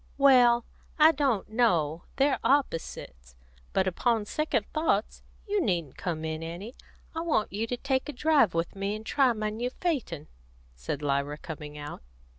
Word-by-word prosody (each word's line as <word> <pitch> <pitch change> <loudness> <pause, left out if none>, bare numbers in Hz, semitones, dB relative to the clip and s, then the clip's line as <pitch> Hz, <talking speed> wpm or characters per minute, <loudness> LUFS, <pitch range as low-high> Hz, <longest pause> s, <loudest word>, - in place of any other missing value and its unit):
"Well, 245 -4 +6 0.3
I 315 0 +7
don't 270 -9 0
know; 175 -9 +1
they're 275 +1 +2
opposites. 65 - -1 0.4
But, 190 - +2
upon 220 +4 +1
second 265 -3 -1
thoughts, 310 -9 0 0.3
you 410 -1 +1
needn't 170 - -1
come 160 -3 -3
in, 160 0 -3
Annie. 175 +8 -6 0.4
I 325 - -3
want 315 -13 0
you 220 +3 -2
to 245 - -2
take 265 +1 -1
a - - -4
drive 275 - +3
with 165 +3 -1
me, 195 +1 -2
and 215 +1 -8
try 270 0 +3
my 215 -1 -2
new 235 +3 -2
phaeton," 255 - -3 0.5
said 60 - -5
Lyra, 140 +1 0
coming 150 -1 -8
out. 145 0 -7
215 Hz, 160 wpm, -28 LUFS, 165-270 Hz, 0.5 s, I